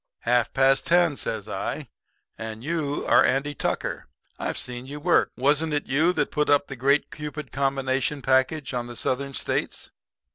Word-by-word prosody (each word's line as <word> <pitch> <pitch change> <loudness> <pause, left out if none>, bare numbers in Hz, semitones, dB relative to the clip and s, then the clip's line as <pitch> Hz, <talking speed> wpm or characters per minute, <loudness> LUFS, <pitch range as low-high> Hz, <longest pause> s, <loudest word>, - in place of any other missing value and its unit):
"'Half 120 -1 +2
past 135 0 +3
ten,' 175 -3 +4
says 110 -5 -4
I, - - -4 0.5
'and 110 0 -7
you 150 -2 -2
are - - +6
Andy 140 +2 +1
Tucker. - - -3 0.3
I've - - -2
seen 125 +1 -2
you 145 +2 -7
work. 175 +3 +3
Wasn't 150 +4 +2
it 145 - 0
you 155 +6 +3
that 150 -4 0
put 150 0 0
up 145 0 +4
the 135 - -5
Great 140 +4 +2
Cupid 150 -2 -6
Combination 135 0 -1
package 135 +2 +1
on 120 -1 -2
the 120 - -8
Southern 135 +3 -2
States? - - -2
140 Hz, 170 wpm, -25 LUFS, 130-150 Hz, 0.5 s, are